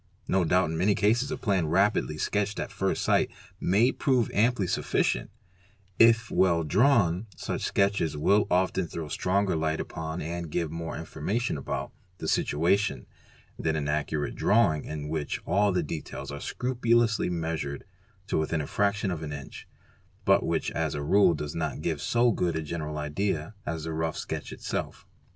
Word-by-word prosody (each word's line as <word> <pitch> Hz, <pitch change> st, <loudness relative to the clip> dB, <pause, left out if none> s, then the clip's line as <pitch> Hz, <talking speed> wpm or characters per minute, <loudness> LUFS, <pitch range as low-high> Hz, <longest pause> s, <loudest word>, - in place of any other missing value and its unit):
No 95 Hz, -1 st, +2 dB
doubt 85 Hz, -1 st, +2 dB
in 80 Hz, -, -3 dB
many 100 Hz, +3 st, +3 dB
cases 115 Hz, +8 st, +2 dB
a -, -, -3 dB
plan 95 Hz, -8 st, +1 dB
rapidly 90 Hz, -2 st, +2 dB
sketched 105 Hz, +4 st, -1 dB
at -, -, -4 dB
first -, -, -1 dB
sight -, -, +3 dB, 0.3 s
may 110 Hz, +8 st, +3 dB
prove 130 Hz, -6 st, +1 dB
amply 110 Hz, -1 st, +2 dB
sufficient; -, -, 0 dB, 0.7 s
if 115 Hz, 0 st, +5 dB
well 85 Hz, -3 st, +3 dB
drawn, 100 Hz, -, +3 dB
such -, -, -4 dB
sketches 100 Hz, -6 st, +1 dB
will 100 Hz, +8 st, +3 dB
often 95 Hz, 0 st, +1 dB
throw 80 Hz, -2 st, -6 dB
stronger 95 Hz, +3 st, +1 dB
light 80 Hz, 0 st, 0 dB
upon 80 Hz, +1 st, -4 dB
and 85 Hz, +1 st, -4 dB
give 85 Hz, 0 st, -2 dB
more 80 Hz, 0 st, -5 dB
informa 80 Hz, +6 st, -3 dB
tion 125 Hz, -, -1 dB
about 70 Hz, -, -4 dB, 0.3 s
the -, -, -5 dB
situation 85 Hz, -2 st, +1 dB, 0.5 s
than 80 Hz, -1 st, 0 dB
an 75 Hz, -2 st, -2 dB
accurate 75 Hz, 0 st, -1 dB
drawing 85 Hz, -10 st, +2 dB
in 75 Hz, -1 st, -5 dB
which 75 Hz, -2 st, -2 dB
all 100 Hz, +2 st, +3 dB
the 90 Hz, -2 st, +1 dB
details 75 Hz, -1 st, -6 dB
are 70 Hz, -, -6 dB
scrupulously 120 Hz, -4 st, +1 dB
measured 80 Hz, -5 st, -3 dB, 0.4 s
to 100 Hz, -, 0 dB
within 80 Hz, +1 st, 0 dB
a 75 Hz, -, -2 dB
fraction 100 Hz, +3 st, 0 dB
of 85 Hz, -3 st, -4 dB
an 75 Hz, -2 st, -5 dB
inch 70 Hz, -2 st, -8 dB, 0.6 s
but -, -, +4 dB
which -, -, -1 dB
as 80 Hz, -3 st, -1 dB
a 70 Hz, -, -3 dB
rule 95 Hz, +2 st, +4 dB
does 75 Hz, 0 st, -5 dB
not 80 Hz, -, -3 dB
give -, -, -1 dB
so 120 Hz, 0 st, +3 dB
good 90 Hz, -5 st, 0 dB
a 80 Hz, -, -2 dB
general 75 Hz, -1 st, -4 dB
idea 75 Hz, +3 st, -2 dB
as 80 Hz, -1 st, -3 dB
the 80 Hz, 0 st, -4 dB
rough 80 Hz, 0 st, -2 dB
sketch -, -, -5 dB
itself. -, -, -4 dB
85 Hz, 170 wpm, -28 LUFS, 80-100 Hz, 0.7 s, if